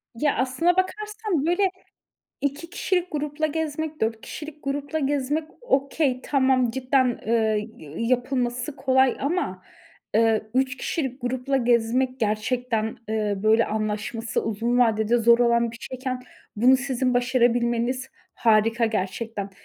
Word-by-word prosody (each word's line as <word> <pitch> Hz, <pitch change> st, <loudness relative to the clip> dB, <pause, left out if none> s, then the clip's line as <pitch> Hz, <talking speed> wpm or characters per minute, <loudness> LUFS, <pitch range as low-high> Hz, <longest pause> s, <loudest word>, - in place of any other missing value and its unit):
Ya, 295 Hz, +4 st, +1 dB
aslına 265 Hz, +7 st, +2 dB
bakarsan 420 Hz, -4 st, -1 dB
böyle, 370 Hz, +2 st, +2 dB, 0.7 s
2 285 Hz, +4 st, -3 dB
kişilik 360 Hz, -2 st, -1 dB
grupla 300 Hz, +1 st, -1 dB
gezmek, 315 Hz, 0 st, -3 dB
4 220 Hz, 0 st, 0 dB
kişilik 300 Hz, -1 st, -9 dB
grupla 285 Hz, +2 st, -2 dB
gezmek 290 Hz, +2 st, 0 dB, 0.2 s
okay, 280 Hz, -, +1 dB
tamam, 260 Hz, -3 st, +2 dB
cidden, 255 Hz, 0 st, +1 dB
eee, 220 Hz, -1 st, +1 dB, 0.3 s
yapılması 250 Hz, +2 st, -1 dB
kolay 260 Hz, 0 st, +3 dB
ama, 275 Hz, -, -2 dB, 0.5 s
eee, 225 Hz, -1 st, +3 dB
3 265 Hz, +1 st, +1 dB
kişilik 265 Hz, -1 st, -3 dB
grupla 255 Hz, +2 st, -1 dB
gezmek 245 Hz, +1 st, +1 dB
gerçekten, 220 Hz, +1 st, -1 dB
eee, 215 Hz, -2 st, 0 dB
böyle 220 Hz, +1 st, +4 dB
anlaşması 215 Hz, +1 st, -2 dB
uzun 230 Hz, +3 st, 0 dB
vadede 225 Hz, -1 st, +3 dB
zor 235 Hz, +1 st, +5 dB
olan 235 Hz, -1 st, +3 dB
bir 230 Hz, -, -11 dB
şeyken, 255 Hz, -1 st, -5 dB, 0.3 s
bunu 255 Hz, +4 st, +6 dB
sizin 255 Hz, -1 st, -1 dB
başarabilmeniz 245 Hz, 0 st, +1 dB, 0.3 s
harika 225 Hz, +1 st, +3 dB
gerçekten. 210 Hz, 0 st, -3 dB
250 Hz, 120 wpm, -24 LUFS, 230-280 Hz, 0.7 s, bunu